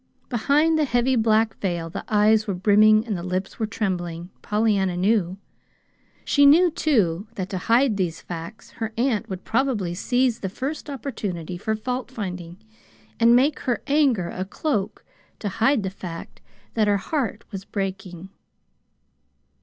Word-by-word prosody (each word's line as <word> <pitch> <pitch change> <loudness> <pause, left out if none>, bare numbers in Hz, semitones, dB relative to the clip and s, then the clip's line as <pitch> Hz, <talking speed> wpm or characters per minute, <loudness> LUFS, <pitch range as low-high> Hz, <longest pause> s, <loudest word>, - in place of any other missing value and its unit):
Behind 295 +7 +2
the 305 - +3
heavy 250 0 +1
black 220 -1 +2
veil 175 -4 -2
the - - -5
eyes 215 +1 +3
were 200 - -1
brimming 215 +3 +5
and 215 -4 -2
the 175 - -4
lips 185 +2 -4
were 220 - 0
trembling, 175 -5 -3
Pollyanna 205 -4 +1
knew. 190 -1 +1 0.9
She 285 - +3
knew, 340 +5 +6
too, 210 - +1
that 190 -1 -4
to 190 - -2
hide 230 +1 +2
these 175 -5 -1
facts 170 +5 -8
her 225 -1 -5
aunt 230 -3 0
would 190 -1 -6
probably 225 -8 0
seize 245 +5 +1
the 190 - -3
first 275 +9 -5
opportunity 205 - -5
for 220 +5 -2
faultfinding, 215 -8 -5 0.6
and 235 +1 +6
make 280 +4 +3
her 245 -3 -2
anger 275 - +2
a 185 - -4
cloak 200 0 -3 0.3
to 205 - -3
hide 230 +4 +2
the 190 - -3
fact 175 -4 -9 0.3
that 215 -2 +2
her 205 -1 +3
heart 265 - -3
was 195 -2 -6
breaking. 190 -3 -5
215 Hz, 150 wpm, -23 LUFS, 185-245 Hz, 0.9 s, knew